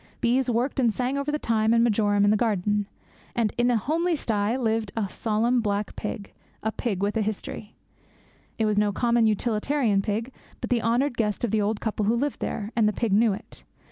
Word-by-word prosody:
Bees 250 +2 +1
worked 245 +4 0
and 240 -3 +3
sang 250 +4 -2
over 280 +1 -1
the 300 - 0
thyme 225 -4 +1
and 230 - +4
marjoram 205 -3 +2
in 205 - +4
the - - +4
garden; 205 -2 0 0.5
and 225 -3 +1
in 240 +1 +2
a 240 - +3
homely 330 - 0
sty 220 -3 0
lived 225 -4 -1
a 210 -3 0
solemn 230 +5 0
black 205 -1 -2
pig, 205 -1 -6 0.3
a 220 - 0
pig 200 -4 -2
with 205 +2 0
a 225 - +1
history. 215 0 -5 0.8
It 225 - +1
was 210 -1 +2
no 210 -1 +2
common 235 +2 +2
utilitarian 220 +1 +1
pig, 225 +5 -3 0.3
but - - -5
the 240 -2 +2
honoured 240 +3 +1
guest 210 -1 -1
of 235 - 0
the 220 - +2
old 205 +1 -1
couple 215 -2 -1
who 225 - +3
lived 285 +4 -1
there; 210 +1 -4
and 225 -2 +3
the - - -3
pig 225 -3 -1
knew 220 +2 +4
it. 210 - -10
225 Hz, 210 wpm, -25 LUFS, 210-240 Hz, 0.8 s, and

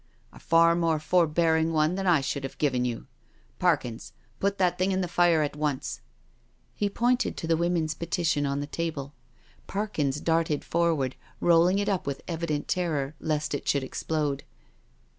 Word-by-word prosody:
A - - -13
far 165 0 +4
more 165 -2 +1
forbearing 160 0 +2
one 155 +1 +2
than 195 +1 -2
I 170 -5 +4
should 135 +1 -3
have 135 - -6
given 130 -4 +1
you. 120 -2 -3 0.5
Parkins, 115 -2 0 0.3
put 200 0 0
that 180 -2 +1
thing 185 +1 +2
in 190 0 0
the 180 - -1
fire 175 -2 +3
at 145 - -3
once." 150 -3 -2 0.7
He 205 - -1
pointed 245 +3 +1
to - - -4
the 165 0 +2
Women's 170 -2 0
Petition 170 -2 -1
on 140 +1 -1
the - - -3
table. 145 -3 -4 0.5
Parkins 155 -9 -1
darted 160 -2 0
forward, 160 -6 +1 0.2
rolling 175 +2 +4
it 205 0 0
up 195 -7 -1
with 140 -1 -4
evi 170 -1 -3
dent 150 -2 -2
terror, 155 -6 -1
lest 150 -1 -1
it 145 - -4
should 140 -2 +2
explode. 145 0 -2
160 Hz, 170 wpm, -27 LUFS, 145-175 Hz, 0.7 s, far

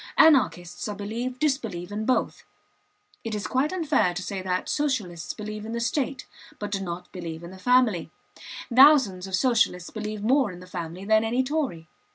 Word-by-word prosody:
Anarchists, 225 - +4
I 210 - -4
believe, 235 +5 -4
disbelieve 230 - -1
in 215 +1 -3
both. 255 - 0 0.8
It 225 -2 -3
is 205 -2 -4
quite 260 +9 0
unfair 315 - +1
to 185 - -3
say 195 0 -4
that 185 -1 -2
Socialists 220 - -2
believe 215 0 -6
in 225 +1 -6
the 235 - -2
state, 260 +2 -1 0.3
but 205 -1 -5
do 195 -1 -1
not 175 -1 -6
believe 170 -3 -7
in 170 - -8
the 190 - -12
family; 245 -6 +3 0.7
thousands 255 -10 +6
of 190 - -1
Socialists 220 -6 +1
believe 215 -1 -5
more 255 -1 +3
in 180 - -10
the 180 - -11
family 175 +1 -6
than 220 +1 +4
any 240 +3 +1
Tory. 255 - -2
215 Hz, 180 wpm, -26 LUFS, 180-255 Hz, 0.8 s, thousands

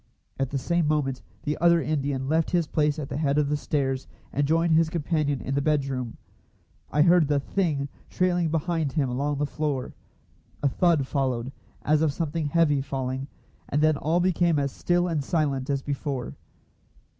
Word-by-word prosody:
At 135 -1 0
the 140 - -2
same 170 +4 0
moment 135 -4 0 0.2
the 150 - -2
other 170 0 +5
Indian 140 -4 -1
left 160 +2 +1
his 175 -2 +2
place 150 -1 +1
at 150 -3 -4
the - - -4
head 145 -2 +1
of 150 -2 +2
the 150 - +1
stairs, 135 -3 -1 0.3
and 145 +1 +1
joined 165 +2 +3
his 160 0 +4
companion 155 -4 0
in 135 - -3
the 140 - +1
bedroom. 135 -5 -1 0.7
I 150 +1 +3
heard 170 -2 +5
the 145 -1 +2
"thing" 145 -3 -1 0.2
trailing 175 -2 +1
behind 160 -2 -1
him 145 -5 +1
along 140 +3 -1
the 145 - 0
floor. 145 -3 -3 0.7
A - - +4
thud 160 0 +2
followed, 130 -3 -1 0.3
as 155 +1 +3
of 155 -3 +2
something 160 0 -2
heavy 150 -3 +3
falling, 135 0 -3 0.4
and 145 - +1
then 155 0 +4
all 160 +4 +1
became 175 -2 +2
as 140 -1 0
still 175 +4 +1
and 160 -5 -1
silent 140 -4 0
as 140 -1 0
before. 140 -3 -3
150 Hz, 180 wpm, -26 LUFS, 140-165 Hz, 0.7 s, other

